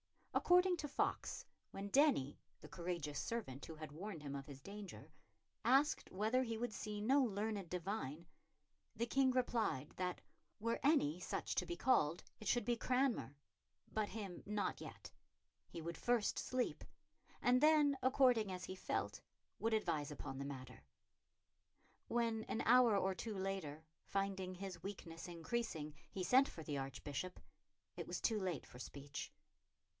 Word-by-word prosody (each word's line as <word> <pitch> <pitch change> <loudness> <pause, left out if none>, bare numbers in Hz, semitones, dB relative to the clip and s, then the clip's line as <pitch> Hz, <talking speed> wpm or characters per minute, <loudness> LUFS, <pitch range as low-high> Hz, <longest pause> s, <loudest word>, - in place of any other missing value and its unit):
According 360 0 +5
to 305 - -3
Foxe, 280 - -1 0.2
when 200 +1 -5
Denny, 265 - +4 0.2
the - - -9
courageous 170 -5 -3
servant 145 - -3
who 160 - -7
had 155 -1 -7
warned 165 0 -6
him 140 -1 -4
of 140 0 -5
his 140 -2 -8
danger, 200 +5 -9 0.5
asked 280 +4 +4
whether 220 +6 +2
he 230 -3 -1
would 235 -1 -2
see 210 +1 -4
no 270 +6 +5
learned 205 -5 -1
divine, 175 -4 -3 0.7
the 235 - 0
King 265 +2 +3
replied 230 - +1
that, 180 -1 -1 0.4
were 230 +2 0
any 270 - +4
such - - -2
to - - +1
be 345 - -2
called, 170 - +3 0.2
it 215 - -7
should 240 - +3
be 240 - +2
Cranmer, 250 - +1 0.6
but 215 -1 +1
him 200 -5 -5
not 210 0 -1
yet. - - -8 0.6
He 165 - -7
would 170 0 -4
first 240 -3 +2
sleep, 255 -1 -1 0.6
and 250 +1 +4
then, 300 -2 +6
according 250 -6 +4
as 180 -1 -4
he 185 - -5
felt, 185 - -2 0.4
would 225 0 +1
advise 165 -9 +1
upon 135 -2 -5
the 140 - -3
matter. 130 -2 -7 1.2
When, 230 -2 +1
an - - -1
hour 240 -3 +7
or 190 -1 +2
two 210 +2 -4
later, 190 -6 -3 0.2
finding 195 -2 -1
his 185 -2 -6
weakness 175 -3 -6
increasing, 170 -3 -3 0.2
he 190 - -3
sent 260 +9 +6
for 160 - -8
the 145 -2 -2
Archbishop, 140 +6 -4 0.6
it - - -5
was - - -2
too 220 -2 +2
late 180 -6 -2
for 125 - -12
speech. 140 +2 -6
200 Hz, 155 wpm, -40 LUFS, 165-240 Hz, 1.2 s, hour